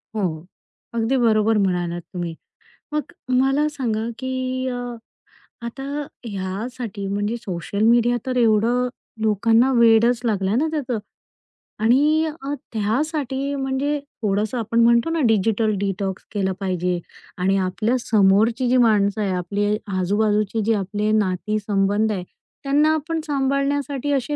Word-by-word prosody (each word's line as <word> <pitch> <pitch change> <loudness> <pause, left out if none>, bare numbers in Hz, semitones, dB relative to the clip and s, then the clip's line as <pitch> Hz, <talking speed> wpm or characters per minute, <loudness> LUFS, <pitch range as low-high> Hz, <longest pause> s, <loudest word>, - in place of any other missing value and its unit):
हो. 175 -6 -2 0.5
अगदी 235 +3 +1
बरोबर 220 -2 +3
म्हणालात 175 -3 0
तुम्ही. 175 -2 -3 0.6
मग 300 +2 -3 0.3
मला 270 +3 +2
सांगा, 230 -6 -2
की 260 0 -2
अ, 245 -1 -4 0.7
आता 270 +4 -6 0.4
ह्यासाठी 200 +2 -5
म्हणजे 205 +3 -1
सोशल 200 -2 -4
मीडिया 240 +1 +4
तर 255 -1 -2
एवढं 235 +2 +3 0.3
लोकांना 225 +4 +3
वेडच 230 +1 +5
लागलं 200 -2 +1
ना 310 - +2
त्याचं 260 -7 -2 0.9
आणि 295 +7 +4 0.2
अ, 275 +1 -3 0.2
त्यासाठी 270 +5 -1
म्हणजे 275 +2 -1 0.2
थोडंसं, 210 +3 0
आपण 230 0 0
म्हणतो 235 +5 +4
ना, 330 0 0
डिजिटल 220 0 +2
डिटॉक्स 195 -1 -2
केलं 190 -2 0
पाहिजे 180 -2 -1 0.4
आणि 190 +2 +2
आपल्या 215 +6 0
समोरची 220 +3 +3
जी 255 - +4
माणसं 215 -3 +3
आहे, 200 -2 0
आपले 205 +3 0 0.2
आजूबाजूची 210 +3 +1
जी 225 - +3
आपले 210 +1 -1
नाती-संबंध 205 +1 +1
आहेत, 185 -4 -3 0.4
त्यांना 295 +3 +3
आपण 315 +1 -2
सांभाळण्यासाठी 275 0 0
असे 275 +2 -1
225 Hz, 125 wpm, -22 LUFS, 200-260 Hz, 0.9 s, वेडच